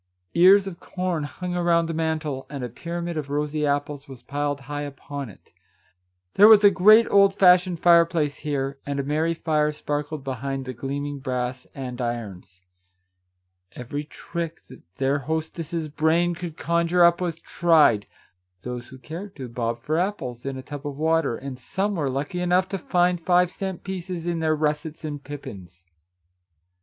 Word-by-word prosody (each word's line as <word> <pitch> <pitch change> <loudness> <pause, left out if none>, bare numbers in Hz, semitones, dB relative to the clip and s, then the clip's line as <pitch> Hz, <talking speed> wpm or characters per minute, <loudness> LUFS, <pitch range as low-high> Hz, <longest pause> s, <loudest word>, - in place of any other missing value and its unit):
Ears 190 +3 +6
of 185 -3 -7
corn 180 -5 -3
hung 180 +4 -5
around 170 -1 +2
the 165 - -3
mantel, 155 -4 -2
and 140 -3 -5
a 125 - -3
pyramid 170 +6 -5
of 145 -2 -4
rosy 150 +1 -1
apples 145 0 -2
was 135 -3 -12
piled 145 0 -2
high 145 +2 -5
upon 140 -2 -6
it. 100 - -18 0.8
There 205 - +8
was 215 -2 +8
a 205 - +8
great 215 +5 +7
old 200 -1 +5
fashioned 180 -2 +5
fireplace 170 -4 +4
here, 140 -2 -3
and 140 0 -3
a - - 0
merry 155 +4 0
fire 150 -2 +1
sparkled 150 0 -4
behind 135 0 -4
the 130 - -5
gleaming 140 +3 -4
brass 125 -1 -3
andirons. 120 -8 -5 1.1
Every 135 +4 -5
trick 165 +2 -6
that 130 - -13
their 135 +4 +1
hostess's 160 +2 -3
brain 160 +3 +1
could 170 -2 -7
conjure 170 +1 +2
up 170 +1 +5
was 170 -2 -2
tried. 155 -15 +3 0.6
Those 125 0 -6
who 130 - -12
cared 170 +9 -8
to, 130 -3 -6
bobbed 115 0 -3
for 155 +4 0
apples 135 - -3
in 135 -1 -3
a 130 - -7
tub 145 +1 -7
of 140 -1 -6
water, 160 -5 +1
and 130 -1 -7
some 195 - -2
were 150 -7 -1
lucky 145 +7 -3
enough 180 +1 +2
to 195 - -3
find 175 +1 +1
five 180 +1 +3
cent 190 -3 -5
pieces 180 -3 -5
in 170 -1 -1
their 155 -1 +2
russets 155 +1 -2
and 145 -2 -5
pippins. 95 -12 -10
150 Hz, 165 wpm, -24 LUFS, 135-170 Hz, 1.1 s, There